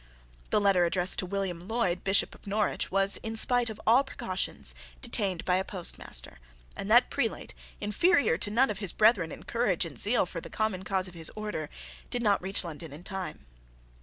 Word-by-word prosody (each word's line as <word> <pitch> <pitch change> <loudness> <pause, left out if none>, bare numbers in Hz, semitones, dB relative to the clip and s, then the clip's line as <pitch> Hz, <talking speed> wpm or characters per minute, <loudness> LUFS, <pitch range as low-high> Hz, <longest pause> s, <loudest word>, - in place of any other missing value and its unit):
The - - +3
letter 195 -3 +4
addressed 180 +1 +1
to 185 - -2
William 185 -2 -3
Lloyd, 215 -6 0
Bishop 195 +1 +2
of - - -16
Norwich, 210 +1 0
was, 195 +1 +3
in 225 0 -5
spite 245 +1 +2
of 220 - -7
all 240 +5 +6
precautions, 185 - -2 0.3
detained 190 - 0
by 180 0 +3
a 190 - 0
postmaster; 170 - -4 0.4
and - - -5
that - - +5
prelate, - - -2 0.3
inferior 265 - +3
to 205 - 0
none 235 +3 +3
of 200 - -6
his 200 -4 -2
brethren 210 -7 +4
in - - -8
courage 220 -8 +1
and 165 - -7
in - - -2
zeal 215 0 +2
for 170 -1 -6
the - - -10
common 215 -4 -1
cause 190 0 -1
of 180 - -11
his 165 -2 -1
order, 210 -8 -4 0.4
did 245 -1 -2
not 205 -2 +3
reach 195 +2 0
London 165 -2 -7
in 150 +5 -9
time. 190 - -6
195 Hz, 195 wpm, -29 LUFS, 175-215 Hz, 0.4 s, all